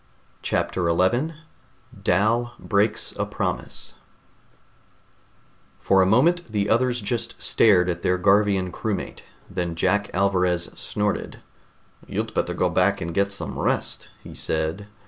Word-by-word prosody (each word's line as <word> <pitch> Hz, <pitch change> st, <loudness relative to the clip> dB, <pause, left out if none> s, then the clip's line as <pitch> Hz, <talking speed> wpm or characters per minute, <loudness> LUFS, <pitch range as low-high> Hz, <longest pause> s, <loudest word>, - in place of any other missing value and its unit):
CHAPTER 90 Hz, -2 st, -1 dB
11 120 Hz, -, +1 dB, 0.7 s
DAL 115 Hz, +6 st, +2 dB
BREAKS 105 Hz, +1 st, 0 dB
A -, -, 0 dB
PROMISE -, -, -4 dB, 1.9 s
For 95 Hz, -1 st, +3 dB
a 95 Hz, -, +4 dB
moment 155 Hz, -, +3 dB
the 100 Hz, -1 st, 0 dB
others 125 Hz, +1 st, +2 dB
just 115 Hz, +2 st, -3 dB
stared 95 Hz, -5 st, +4 dB
at 85 Hz, -1 st, -2 dB
their 90 Hz, -, +1 dB
Garvian 100 Hz, -1 st, +3 dB
crewmate. 105 Hz, +3 st, -4 dB, 0.3 s
Then 90 Hz, -3 st, -3 dB
Jack 100 Hz, +4 st, +1 dB
Alvarez 90 Hz, -2 st, +1 dB
snorted. 105 Hz, 0 st, -3 dB, 0.7 s
"You'd -, -, -3 dB
better -, -, -1 dB
go -, -, +2 dB
back 100 Hz, +2 st, +2 dB
and 85 Hz, -2 st, -4 dB
get 100 Hz, +2 st, +1 dB
some 100 Hz, -, -5 dB
rest," -, -, -1 dB, 0.2 s
he -, -, -10 dB
said. 80 Hz, +6 st, -2 dB
100 Hz, 125 wpm, -24 LUFS, 90-110 Hz, 1.9 s, a